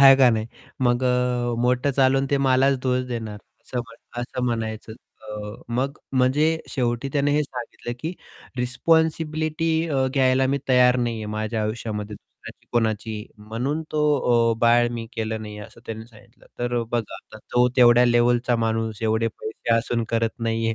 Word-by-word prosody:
आहे 135 -1 +10
का 130 -2 +6
नाही? 110 -1 -1 0.3
मग 120 0 +2
अ, 125 -1 +1
मोठं 125 +3 +2
चालून 135 0 +3
ते 140 - +3
मलाच 130 +1 +4
दोष 130 0 +1
देणार 110 -4 -5 0.2
असं 125 - -5
म्हण 115 +1 -10
असं 125 +1 -4
म्हणायचं 110 -2 -3 0.3
अ 105 -1 -7 0.2
मग 135 +4 -1
म्हणजे 130 +4 +3 0.2
शेवटी 120 0 -1
त्याने 145 0 +2
हे 150 +1 +3
सांगितलं 125 -3 -6
की 160 +2 -3 0.4
रिस्पॉन्सिबिलिटी 155 +4 +1 0.2
अ, 135 -3 +1
घ्यायला 130 0 +3
मी 140 +2 0
तयार 125 -1 +5
नाही 120 -2 -1
आहे. 110 -1 -5
माझ्या 110 +1 -2
आयुष्यामध्ये 105 -1 -4
दुसऱ्याची - - -15
कोणाचीही. 110 -2 -1
म्हणून 120 +9 -3
तो 155 - 0 0.5
अ, - - -1
"बाळ 120 0 +5
मी 115 -1 -5
केलं 110 0 -3
नाही" 105 -1 -8
असं 105 +2 -11
त्यांनी 110 0 -6
सांगितलं. 115 +1 -20
तर 120 0 -1
अ, - - -1
बघा, 115 -3 -2
आता 110 - -12
तो 125 0 +4
तेवढ्या 120 -1 +7
लेव्हलचा 120 0 +3
माणूस, 115 -1 -1
एवढे 110 +1 +1
पैसे 110 +1 -3
असून 115 0 0
करत 115 0 -1
नाही 115 0 0
आहे. 115 - 0
120 Hz, 170 wpm, -23 LUFS, 115-130 Hz, 0.5 s, आहे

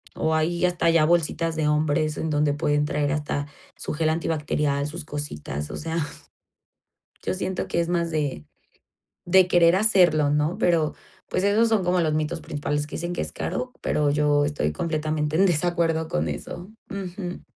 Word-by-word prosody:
o 160 0 0
hay 170 +3 +1
hasta 175 -1 0
ya 165 -2 +4
bolsitas 165 0 +1
de 155 -1 +1
hombres 150 0 +1
en 160 - -2
donde 150 -1 +2
pueden 145 0 +1
traer 145 -1 0
hasta 145 -1 -2 0.3
su - - -4
gel 155 +1 +1
antibacterial, 150 -3 0
sus 160 +2 -6
cositas, 75 - -5
o - - -5
sea 165 +1 -3 1.3
yo - - -1
siento 190 0 -3
que 170 - 0
es 170 - -1
más 170 -1 0
de 145 - -2 0.8
de 185 +1 +6
querer 175 -1 +5
hacerlo, 180 -8 +4
¿no?, 150 +3 +1
pero, 165 -3 +2 0.3
pues, 185 - -1
esos 215 +3 +4
son 220 -4 +2
como 180 0 +2
los 155 -2 +1
mitos 155 +2 -1
principales 145 0 -3
que 150 - -7
dicen 175 +1 -3
que 175 - -3
es - - -3
caro, 250 0 -4
pero 150 -1 +1
yo 145 0 +2
estoy 145 - -1
completamente 155 - -1
en 190 - +5
desacuerdo 165 -2 +1
con 75 - -1
eso, 175 - -7 0.2
ujú. 185 -2 -6
160 Hz, 175 wpm, -24 LUFS, 150-175 Hz, 1.3 s, de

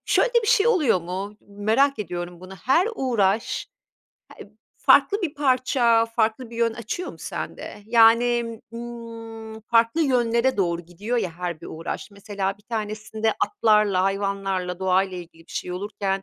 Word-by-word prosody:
şöyle - - +3
de 475 - +5
bir - - -3
şey 475 -3 +4
oluyor 305 - +3
mu, 190 +4 -5
merak 220 +7 +1
ediyorum, 175 -3 -5
bunu 185 +1 -10
her 270 - +2
uğraş 225 - 0 0.9
heb - - -35
farklı 410 +1 +5
bir 320 -4 -2
parça, 255 -5 +3
farklı 230 +1 -1
bir 235 - -9
yön 230 -1 +2
açıyor 235 - -5
mu - - -15
sende? 205 - -6
Yani, 230 0 +4
ımm, 230 -2 -8
farklı 230 +6 +2
yönlere 250 -3 +2
doğru 170 -4 0
gidiyor 195 +8 -4
ya 190 -7 0
her 170 -1 -5
bir - - -9
uğraş, 165 +5 -6
mesela 200 -1 -4
bir 210 - -23
tanesinde 215 0 -2
atlarla, 210 - +3
hayvanlarla, 195 -2 -1
doğayla 190 0 +1
ilgili 165 -1 -11
bir - - -14
şey 180 - -4
olurken 195 0 -3
220 Hz, 150 wpm, -24 LUFS, 195-235 Hz, 0.9 s, de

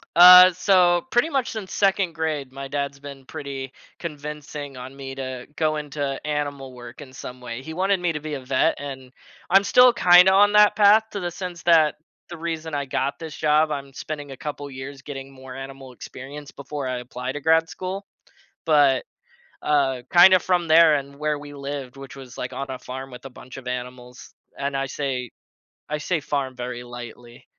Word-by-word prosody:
Uh, 180 +1 +10
so 180 0 +3
pretty 240 +6 +2
much 270 -5 -1
since 210 -4 -7
2nd 195 -3 +1
grade, 155 -4 -3
my 135 +1 -7
dad's 140 0 -4
been 140 -1 -10
pretty 135 -3 -7 0.3
convincing 150 -3 -7
on 130 +1 -9
me 135 -1 -8
to 130 -2 -6
go 155 -1 0
into 145 -2 -4
animal 145 -3 -3
work 120 +1 -11
in 130 -3 -12
some 125 -1 -9
way. 125 0 -7
He 160 +4 -8
wanted 190 +3 +1
me 175 -1 0
to 150 - -4
be 155 0 -6
a 140 - -4
vet, 130 0 +1
and 135 -3 -8 0.4
I'm 195 +2 +5
still 250 +4 +6
kinda 180 -2 +6
on 205 +1 +5
that 210 0 +6
path 210 +1 +6
to 200 - -5
the 175 -1 -3
sense 175 0 -7
that 160 -3 +4 0.3
the 170 - -8
reason 160 -1 -4
I 140 -1 -2
got 135 +1 -2
this 160 -3 -8
job, 155 0 +2
I'm 140 -2 -5
spending 145 0 -7
a 135 - -9
couple 145 0 -6
years 135 +1 -9
getting 135 -1 -8
more 130 -1 -11
animal 135 -1 -9
experience 140 +4 -10
before 140 -1 -6
I 130 - -2
apply 125 +1 -6
to 145 - -6
grad 160 +1 +3
school. 190 +2 -6 0.6
But, 145 -4 +4 0.6
uh, 135 -4 +1
kinda 185 +1 +8
from 175 -2 0
there 160 -1 +7
and 140 0 -4
where 150 0 -1
we 145 0 -10
lived, 140 -2 -6
which 135 -1 -10
was, 130 -3 -12
like, 125 - -4
on 140 - -4
a 130 - -5
farm 130 +2 -8
with 125 0 -12
a 135 - -8
bunch 125 - -12
of 135 -2 -11
animals. 125 0 -7 0.2
And 140 0 -3
I 135 0 -1
say 130 -3 -4 0.6
I 150 - -1
say 160 +2 -2
farm 140 -3 -3
very 125 0 -6
lightly. 120 0 -11
145 Hz, 195 wpm, -23 LUFS, 130-165 Hz, 0.6 s, Uh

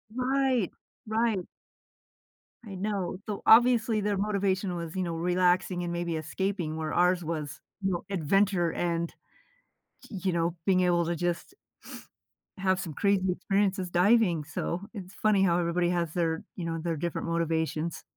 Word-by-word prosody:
Right. 255 -4 +1 0.4
Right. 220 -2 +1 1.2
I 200 -3 -7
know. 190 -1 -2
So, 210 -2 -4
obviously, 230 -1 +5
their 205 -1 0
motivation 195 -2 0
was, 170 0 -5
you 185 - 0
know, 170 -2 -3
relaxing 180 +1 +1
and 175 - -3
maybe 170 -1 -2
escaping; 160 +1 -2
where 155 -1 -3
ours 180 0 +3
was, 155 -2 -4 0.2
you 195 -1 0
know, 175 - -2
adventure 190 0 +2
and, 170 -1 -1 1.0
y 195 - -6
you 185 - +3
know, 170 0 0
being 185 -2 +3
able 175 -1 +2
to 170 +1 -1
just 175 - -2 1.0
have 185 -1 +1
some 165 -4 -5
crazy 190 +2 +2
experiences 195 0 0
diving; 180 -2 +3
so 170 +3 -3
it's 190 -3 -8
funny 215 -3 +2
how 175 -3 +3
everybody 175 0 +1
has 170 -3 -1
their, 165 -2 0
you 175 - -4
know, 165 0 -2
their 165 -1 -2
different 170 +2 -3
motivations. 165 -1 -1
180 Hz, 150 wpm, -28 LUFS, 170-200 Hz, 1.2 s, obviously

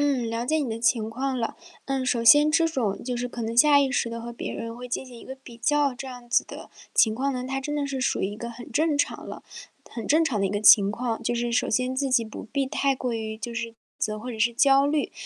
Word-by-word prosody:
嗯， 265 -5 +1
了 230 +1 -3
解 315 +3 +1
你 280 -6 -2
的 220 - -3
情 230 -2 +1
况 265 +3 -2
了。 230 -2 -3 0.3
嗯， 270 -1 -1
首 245 -2 +1
先 295 +6 +7
这 330 +1 +3
种 235 -11 -2
就 250 0 -3
是 245 +1 -2
可 240 -1 -6
能 225 +1 -3
下 285 +2 +6
意 275 -2 +1
识 255 - 0
地 230 0 -6
和 235 +1 -7
别 235 - -5
人 230 0 -6
会 250 +1 -8
进 245 - -3
行 250 -2 -12
一 - - -13
个 265 - -7
比 265 -3 -14
较 285 +4 +1
这 260 +2 -8
样 245 -2 -10
子 - - +3
的 - - -10 0.2
情 220 -1 +4
况 275 +3 0
呢， 250 -1 -3
它 270 0 -2
真 295 +2 -4
的 290 -1 -1
是 275 -1 -3
属 265 - 0
于 - - +1
一 205 - -7
个 235 +2 -6
很 235 0 -10
正 310 0 +1
常 285 - -2
了 - - -8 0.5
很 230 -3 -6
正 320 +3 +4
常 260 -9 -1
的 195 - +1
一 - - -1
个 205 0 -2
情 205 -1 +7
况， 235 0 -3
就 240 - -1
是 240 0 -1
首 235 - +1
先 255 +3 0
自 275 +1 0
己 245 -2 +3
不 220 - -9
必 280 -1 +1
太 275 +1 0
过 250 -1 -3
于 220 -1 -4
就 235 +2 -6
是 230 0 -4 0.3
自 215 - -1
责 215 - -6
或 250 +3 -6
者 225 - -7
是 235 +2 +2
焦 275 +2 +4
虑。 295 0 0
245 Hz, 305 characters per minute, -25 LUFS, 230-275 Hz, 0.5 s, 先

